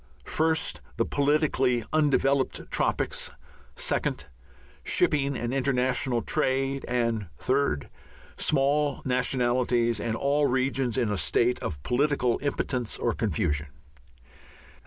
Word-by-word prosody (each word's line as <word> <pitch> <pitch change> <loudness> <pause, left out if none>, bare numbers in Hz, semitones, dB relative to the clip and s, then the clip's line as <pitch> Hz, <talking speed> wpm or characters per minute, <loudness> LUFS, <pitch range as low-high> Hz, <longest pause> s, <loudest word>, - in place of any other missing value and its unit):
(1) 160 +1 +3 0.4
The - - +2
politically 140 -4 +2
undeveloped 140 -3 +1
tropics; - - -1 0.5
(2) - - 0 0.8
Shipping 140 -2 +1
and 120 +1 -3
international 130 -2 +1
trade; 135 -2 0
and 115 -4 0
(3) 130 - +1 0.5
Small 145 +1 +1
nationalities 125 -2 +1
and 115 0 -2
all 145 +2 +2
regions 130 -1 0
in 120 -5 +1
a 105 - -1
state 125 +1 +2
of 70 -2 -5
political 125 -2 +1
impotence 130 -4 -2
or 120 - 0
confusion? 80 -7 -1
130 Hz, 100 wpm, -27 LUFS, 120-140 Hz, 0.8 s, 1